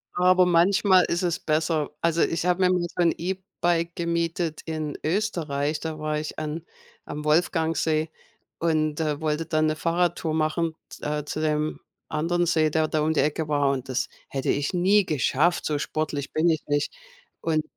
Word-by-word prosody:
Aber 180 0 +5
manchmal 185 +2 +4
ist 170 - -1
es 170 -2 0
besser. 155 -1 0
Also, 170 0 +2
ich 165 - +1
habe 180 +1 +2
mir 180 - +5
mal 180 - +1 0.2
so - - +2
'n 170 -1 +4
E-Bike 175 -2 -1
gemietet 170 -1 -1
in 155 -2 -4
Österreich. 155 -6 -1
Da 160 -1 -5
war 155 0 -1
ich 155 - -6
an 155 +2 -4 0.4
am 150 +1 -6
Wolfgangsee 160 0 +1 0.5
und, 155 -2 +1
äh, 150 -2 -1
wollte 155 +1 -1
da 155 -1 0
'ne 155 0 +2
Fahrradtour 165 0 0
machen, 160 +1 0
z - - -12
äh, 150 0 -2
zu 150 - -4
dem 155 0 0 0.3
anderen 170 +3 0
See, 160 -2 +3
der 155 0 +1
da 155 - 0
um 155 +1 +1
die 155 - +3
Ecke 155 +1 -1
war 145 -2 +2
und 135 -2 -3
das 130 0 -1 0.2
hätte 135 -1 -3
ich 145 +3 0
nie 190 +3 +4
geschafft, 155 +3 +1
so 150 -2 0
sportlich 150 -2 -3
bin 160 +2 +3
ich 160 -2 +1
nicht 145 0 0 0.5
und 155 -2 0
160 Hz, 180 wpm, -25 LUFS, 150-170 Hz, 0.5 s, Aber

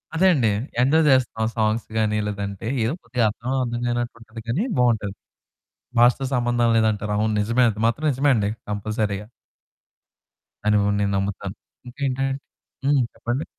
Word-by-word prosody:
అదే 190 +3 +4
అండి. 125 -8 +2 0.3
ఎంజాయ్ 155 +5 +4
చేస్తున్నాం 120 -4 +2
సాంగ్స్ 110 +1 +1
గాని, 105 -1 +1
లేదంటే 100 0 -4 0.2
ఏదో 115 +7 0
కొద్దిగా 115 0 0
అర్థం, 115 +3 -6
అర్థం 120 -1 -3
కానట్టుంటది 115 -2 -4
కానీ 135 - 0 0.2
బావుంటది. 110 -5 +2 0.9
భాషతో 125 +3 +4
సంబంధం 120 -1 +2
లేదంటారు. 105 -2 +1
అవును 110 0 +1
నిజమే. 115 +4 +2
అది 105 0 -6
మాత్రం 145 +7 0
నిజమే 140 +3 +2
అండి. 105 -2 +1 0.2
కంపల్సరీగా. 105 0 -2 1.4
అని 105 0 +4 0.2
నేను 100 0 +1
నమ్ముతాను 100 0 -3 0.3
ఇంకేంటంటే 135 0 -2 0.5
హ్మ్, 140 -1 +4
చెప్పండి. 125 +6 -3
115 Hz, 130 wpm, -23 LUFS, 105-125 Hz, 1.4 s, అదే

